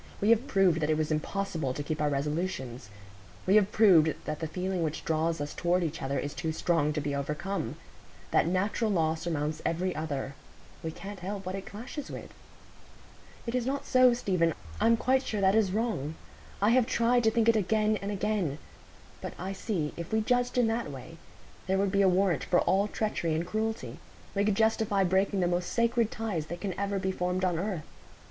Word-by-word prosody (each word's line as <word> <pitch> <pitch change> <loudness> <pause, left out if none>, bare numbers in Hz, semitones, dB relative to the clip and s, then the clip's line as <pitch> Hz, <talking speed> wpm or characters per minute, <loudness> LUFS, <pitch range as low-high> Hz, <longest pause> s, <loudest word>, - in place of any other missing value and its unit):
"We 210 +3 +3
have 230 +4 +3
proved 190 -5 +3
that 150 -1 0
it 155 - +2
was 155 0 -1
impossible 160 -3 -2
to 145 - -3
keep 155 +1 -3
our 150 - +2
resolutions. 140 - -3 0.6
We 190 - +3
have 205 -1 +3
proved 170 -8 +5
that 155 0 -3
the 160 - -2
feeling 185 +2 -2
which 160 -1 -2
draws 160 0 0
us 145 0 -4
toward 180 +1 +1
each 165 0 -3
other 135 +1 -1
is 145 - -3
too 165 -2 -2
strong 160 -2 +1
to 150 - -1
be 145 -1 -2
overcome. 150 0 -3 0.6
That - - +3
natural 200 +5 0
law 160 -5 +2
surmounts 155 -2 -3
every 180 +2 -1
other; 145 -3 -3 0.5
we 160 - -2
can't 200 +4 -8
help 195 +1 -5
what 185 - -3
it 195 0 -6
clashes 255 +7 -7
with." - - -8 1.1
"It 235 - -3
is 250 -1 0
not 275 +1 -2
so, 255 -1 +5
Stephen; 180 -8 +1 0.2
I'm 230 +2 +4
quite 260 +3 +2
sure 215 -5 -3
that 190 0 +4
is 215 -3 +3
wrong. 200 - -1 0.5
I 210 - +5
have 245 -1 +4
tried 240 0 +2
to - - +6
think 225 0 +1
it 230 - +6
again 215 +1 +2
and 200 - -5
again; 200 -7 -1 0.6
but - - -5
I 190 +2 -4
see, 180 -7 -2
if 170 0 -6
we 220 0 +2
judged 245 +2 +1
in 245 - +5
that 225 -4 -1
way, 145 +4 -9 0.5
there 190 +1 +2
would 195 0 +1
be 200 0 +3
a 195 - +5
warrant 185 -2 +2
for 175 - +3
all 195 +2 +2
treachery 200 -7 -1
and 165 +2 -1
cruelty; 220 +4 -3 0.3
we 200 - +1
should 210 -2 +2
justify 220 -2 +2
breaking 190 +1 +2
the 175 - +2
most 175 0 -1
sacred 235 -1 +2
ties 205 -10 -3
that 175 +2 -6
can 195 -3 -3
ever 200 0 -1
be 190 0 -1
formed 180 0 -1
on 175 -3 0
earth. 185 -4 -2
190 Hz, 205 wpm, -29 LUFS, 160-215 Hz, 1.1 s, to